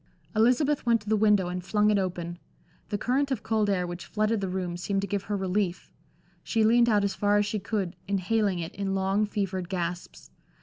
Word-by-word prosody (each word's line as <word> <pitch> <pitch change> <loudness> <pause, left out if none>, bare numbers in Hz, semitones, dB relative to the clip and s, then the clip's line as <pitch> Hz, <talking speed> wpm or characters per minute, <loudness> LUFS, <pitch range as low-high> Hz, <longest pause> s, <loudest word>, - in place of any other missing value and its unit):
Elizabeth 255 +6 +3
went 235 -1 +3
to 210 - -18
the 220 - +4
window 210 -3 +3
and 180 0 -4
flung 210 +2 +2
it 205 - +3
open. 175 -2 -3 0.5
The 205 - -1
current 265 +6 0
of 260 -5 -2
cold 220 -2 +1
air 185 -3 +1
which 175 -2 -7
flooded 215 0 0
the 190 - -2
room 180 -2 -3
seemed 195 +3 -1
to 200 - -3
give 200 -1 -2
her 205 -1 -2
relief; 190 -1 -2 0.5
she 225 -2 0
leaned 235 +2 +5
out 210 -2 +3
as 200 - 0
far 205 0 +2
as 205 - +2
she 210 +1 -2
could, 195 -3 -3
inhaling 200 0 +1
it 165 -1 -5
in 195 -1 -2
long, 195 +2 +1
fevered 190 -3 -3
gasps. 175 -1 -5
200 Hz, 210 wpm, -27 LUFS, 185-215 Hz, 0.5 s, leaned